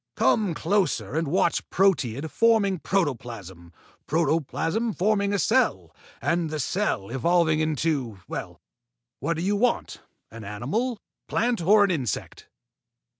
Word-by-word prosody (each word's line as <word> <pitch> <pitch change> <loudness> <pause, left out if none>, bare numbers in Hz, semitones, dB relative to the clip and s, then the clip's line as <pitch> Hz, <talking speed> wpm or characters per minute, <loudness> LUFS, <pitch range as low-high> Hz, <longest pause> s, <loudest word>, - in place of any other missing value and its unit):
Come 200 -7 +2
closer 195 +2 0
and 160 0 0
watch - - +1
proteid 160 - +1
forming 220 -5 +3
protoplasm, 115 - -3 0.4
protoplasm 165 - 0
forming 200 +1 +1
a 200 - +1
cell, 255 +6 +1 0.3
and 170 -1 +1
the 155 0 -4
cell 145 - -1
evolving 160 +4 +2
into 150 -8 -1
well, 85 -3 -6 0.6
what 170 - -1
do 165 - -3
you 200 +2 +1
want, 240 +4 0 0.3
an 115 -1 -9
animal, 140 - -2 0.3
plant, 235 -3 0
or 205 +5 +5
an 200 - +2
insect?" 135 -10 -3
165 Hz, 125 wpm, -25 LUFS, 135-200 Hz, 0.6 s, or